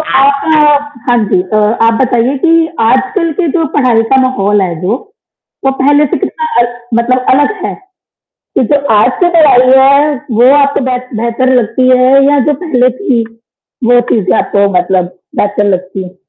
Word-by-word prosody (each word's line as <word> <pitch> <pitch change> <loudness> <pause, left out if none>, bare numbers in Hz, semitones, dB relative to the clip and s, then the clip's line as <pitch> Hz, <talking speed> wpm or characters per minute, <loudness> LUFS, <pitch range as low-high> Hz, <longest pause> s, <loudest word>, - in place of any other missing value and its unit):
आप 280 -2 +1
हाँ, 300 -2 +3 0.3
हाँ 245 - +3
जी, 180 - +1
तो 215 +3 -2 0.3
आप 230 - +2
बताइए 250 +1 0
कि 335 - +3 0.3
आजकल 260 - 0
की 340 - -1
जो 330 - 0
पढ़ाई 250 -5 +2
का - - +5
माहौल 210 -6 0
है 180 -2 -3
जो, 195 +6 -1 0.7
वो 270 - +2
पहले 290 +2 +3
से - - 0
कितना 470 - -4
अल 240 - +1 0.3
मतलब 255 +2 -1
अलग 290 +8 +1
है, - - -3 0.6
कि - - -4
जो 290 - +3 0.2
आज 210 +4 +3
की 350 - +4
पढ़ाई 265 -6 +4
है, 280 +2 +3 0.2
वो 245 +2 +5
आपको 280 -1 0
बेह 250 -1 -3 0.2
बेहतर 255 +3 0
लगती 255 +3 -1
है 255 0 +2 0.2
या 290 0 +2
जो 300 - +1
पहले 255 -6 +1
थी, 250 -11 0 0.6
वो 245 +1 +4
चीज़ें 185 -6 0
आपको 200 0 0
मतलब 180 0 -2 0.2
बेहतर 205 0 -1
लगती 185 +1 -4
हैं? 180 0 -12
255 Hz, 175 wpm, -10 LUFS, 220-280 Hz, 0.7 s, का